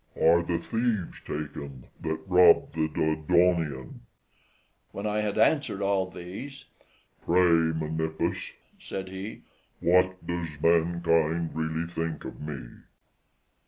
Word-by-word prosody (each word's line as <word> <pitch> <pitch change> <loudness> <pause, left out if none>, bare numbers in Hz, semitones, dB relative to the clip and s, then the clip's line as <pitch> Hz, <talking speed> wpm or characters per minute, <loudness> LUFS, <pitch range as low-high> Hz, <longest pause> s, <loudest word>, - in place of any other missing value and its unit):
are 85 +1 +5
the 85 0 -1
thieves 110 +1 -2
taken 70 -3 -6 0.2
that 80 0 -3
robbed 90 -2 +5
the 80 -1 0
Dodonaean?" 80 -2 +1 0.9
When 100 - -5
I 105 0 0
had 105 -1 -2
answered 140 -10 +2
all 100 -1 +1
these, 100 +11 -8 0.6
"Pray, 85 -2 +4
Menippus," 80 0 -2 0.3
said 95 -1 -6
he, 95 +3 -7 0.4
"what 90 +1 +2
does 85 -4 -4
mankind 85 0 +2
really 80 +1 -2
think 80 -2 -4
of - - -8
me?" 70 -5 -7
85 Hz, 110 wpm, -27 LUFS, 80-95 Hz, 0.9 s, are